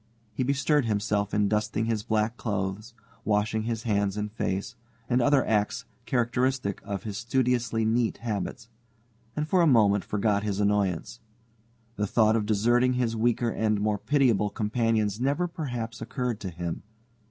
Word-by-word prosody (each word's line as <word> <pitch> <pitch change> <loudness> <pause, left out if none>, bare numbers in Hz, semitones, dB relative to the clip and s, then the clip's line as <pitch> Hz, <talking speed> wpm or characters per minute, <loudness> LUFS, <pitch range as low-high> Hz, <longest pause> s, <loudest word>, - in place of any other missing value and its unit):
He 110 - -3
bestirred 140 +1 +2
himself 105 -1 0
in 105 -1 +2
dusting 105 +1 0
his 115 -2 0
black 110 +1 0
clothes, 105 0 -3 0.3
washing 110 +1 0
his 115 -1 -2
hands 100 -3 0
and 105 0 -3
face, 100 -3 -3 0.3
and 125 0 +2
other 140 0 +3
acts 105 -1 0 0.2
characteristic 125 -3 0
of 100 -2 -4
his 105 -2 -5
studiously 120 -2 0
neat 115 +1 +1
habits, 110 -1 -4 0.7
and 150 0 -2
for 185 +1 +3
a 170 - +5
moment 105 -7 +4
forgot 105 -1 0
his 105 -1 -2
annoyance. 100 0 0 0.8
The 105 +1 0
thought 110 +1 +3
of 105 -2 0
deserting 120 +4 +3
his 120 -2 0
weaker 115 +1 +1
and 110 -2 0
more 105 0 0
pitiable 125 -8 +2
companions 110 0 0
never 145 +7 +1
perhaps 120 - -5
occurred 125 -5 -3
to 95 - -5
him. 85 -1 -5
110 Hz, 155 wpm, -27 LUFS, 105-120 Hz, 0.8 s, a